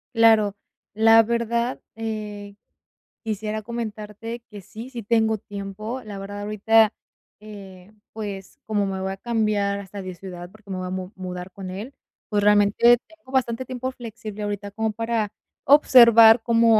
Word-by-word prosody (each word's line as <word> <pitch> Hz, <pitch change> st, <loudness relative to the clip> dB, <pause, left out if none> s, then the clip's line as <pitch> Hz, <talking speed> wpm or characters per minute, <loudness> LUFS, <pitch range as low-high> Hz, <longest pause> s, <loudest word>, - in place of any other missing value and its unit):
Claro, 220 Hz, -3 st, +5 dB, 0.4 s
la 225 Hz, +1 st, +6 dB
verdad, 235 Hz, +2 st, -1 dB
eh, 210 Hz, -2 st, -5 dB, 0.7 s
quisiera 215 Hz, 0 st, -3 dB
comentarte 225 Hz, 0 st, -6 dB
que 205 Hz, -2 st, -10 dB
sí, 225 Hz, +7 st, -10 dB
si 240 Hz, -4 st, -7 dB
tengo 220 Hz, 0 st, +2 dB
tiempo, 205 Hz, +5 st, -6 dB
la 205 Hz, -2 st, -7 dB
verdad 205 Hz, +1 st, -7 dB
ahorita, 215 Hz, +1 st, +3 dB, 0.5 s
eh, 195 Hz, -2 st, -12 dB, 0.2 s
pues, 200 Hz, -3 st, -7 dB
como 210 Hz, -2 st, 0 dB
me 190 Hz, -1 st, -3 dB
voy 190 Hz, 0 st, -2 dB
a 195 Hz, -, -6 dB
cambiar 210 Hz, -3 st, 0 dB
hasta 200 Hz, +1 st, -8 dB
de 185 Hz, -1 st, -7 dB
ciudad 175 Hz, -1 st, -9 dB
porque 215 Hz, 0 st, -20 dB
me 185 Hz, -, -3 dB
voy 185 Hz, 0 st, -4 dB
a -, -, -5 dB
mu 185 Hz, +1 st, -5 dB
mudar 180 Hz, 0 st, -6 dB
con 190 Hz, -1 st, -8 dB
él, 210 Hz, +9 st, -7 dB, 0.4 s
pues 205 Hz, -1 st, +1 dB
realmente 210 Hz, +4 st, +5 dB
tengo 320 Hz, -5 st, -18 dB
bastante 255 Hz, -1 st, 0 dB
tiempo 255 Hz, +1 st, -4 dB
flexible 220 Hz, -4 st, -8 dB
ahorita 205 Hz, 0 st, -4 dB
como 220 Hz, +1 st, -2 dB
para 225 Hz, -2 st, -2 dB, 0.3 s
observar 235 Hz, -5 st, +8 dB
cómo 230 Hz, -1 st, +4 dB
215 Hz, 155 wpm, -23 LUFS, 200-230 Hz, 0.7 s, observar